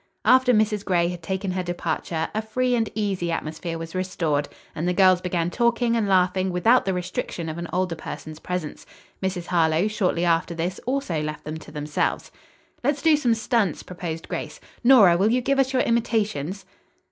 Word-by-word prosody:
After 255 0 +5
Mrs. 215 -2 +2
Gray 175 -3 +2
had 175 -1 -6
taken 190 +3 -3
her 185 0 -1
departure 170 -2 -3
a 215 - 0
free 250 +3 0
and 225 -3 +1
easy 195 -5 -1
atmosphere 165 +1 -4
was 165 0 -7
restored 165 -6 -1 0.2
and 165 +3 -3
the 180 - 0
girls 185 -2 +5
began 175 -1 -1
talking 235 +1 +1
and 220 -3 +1
laughing 185 0 +2
without 225 +8 +3
the 190 - 0
restriction 180 -2 -4
of 160 +1 -5
an 170 - -4
older 185 -1 0
person's 155 -1 -8
presence. 180 -4 -5 0.3
Mrs. 185 -2 -2
Harlowe 165 +1 +2
shortly 185 -5 0
after 170 0 +1
this 175 +3 -3
also 255 - -1
left 150 0 -5
them 155 +1 -5
to 155 - -13
themselves. 150 0 -2 0.5
"Let's 285 +2 0
do 320 -2 +6
some 245 -6 +2
stunts," 220 -6 0
proposed 170 -3 -6
Grace. - - -5 0.2
"Nora, 230 -9 +7
will 200 +4 +3
you 245 +2 +2
give 275 +2 0
us 265 -1 +2
your 255 -1 +2
imitations?" 205 -6 -1
185 Hz, 180 wpm, -24 LUFS, 170-220 Hz, 0.5 s, Nora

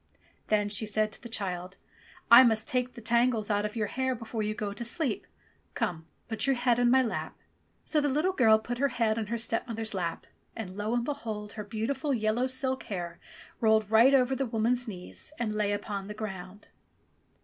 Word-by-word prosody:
Then 210 -1 +2
she 210 +1 0
said 215 +1 +1
to - - -7
the 235 - -9
child, 185 -3 -3 0.5
"I 235 +2 +11
must 220 -3 +2
take 250 0 -1
the 235 - -10
tangles 230 -1 +2
out 205 +1 +1
of 210 - -11
your 220 -2 0
hair 260 +4 -1
before 225 -1 -5
you 215 0 -1
go 205 -2 -3
to 210 - -6
sleep. 240 0 -2 0.5
Come, 160 -2 -2 0.2
put 225 +3 -2
your 270 - +3
head 245 -1 +2
on 245 -1 +4
my 260 +1 +5
lap." 230 - -4 0.5
So 305 - +1
the 290 - +1
little 310 +8 +1
girl 220 -8 +5
put 240 +2 -5
her 280 - +3
head 230 -4 0
on 215 - -3
her 235 +2 -2
stepmother's 225 -1 -2
lap, 175 -3 -3 0.3
and 190 -5 -6
lo, 210 +3 -1
and 240 - +1
behold! 220 -7 -4
her 210 - -5
beautiful 245 +7 -2
yellow 220 +3 +1
silk 260 0 0
hair 175 -4 -5 0.4
rolled 220 -2 +3
right 235 +5 +7
over 260 0 +3
the 270 -1 -1
woman's 235 +2 0
knees 185 +7 -6
and 225 -3 -1
lay 210 -1 0
upon 205 -1 -3
the 210 - -7
ground. 195 -2 -7
225 Hz, 200 wpm, -29 LUFS, 210-245 Hz, 0.5 s, I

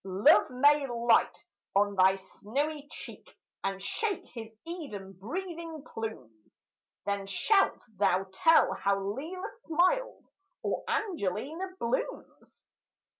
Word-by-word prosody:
Love 195 +2 +5
may 285 +3 +4
light 235 -1 +2 0.3
on 205 +1 +3
thy 190 0 +5
snowy 280 +10 -3
cheek, - - -11 0.3
And 195 0 -1
shake 395 - -2
his 225 -2 -7
Eden 275 - -6
breathing 325 - -6
plumes; 125 - -8 0.4
Then 200 -1 -1
shalt 390 - +2
thou 190 -1 +3
tell 325 - +5
how 200 0 +1
Lelia 275 - -4 0.2
smiles, 370 +8 +1 0.3
Or - - -1
Angelina 320 - -2
blooms. 235 - -4
235 Hz, 105 wpm, -30 LUFS, 195-330 Hz, 0.4 s, Love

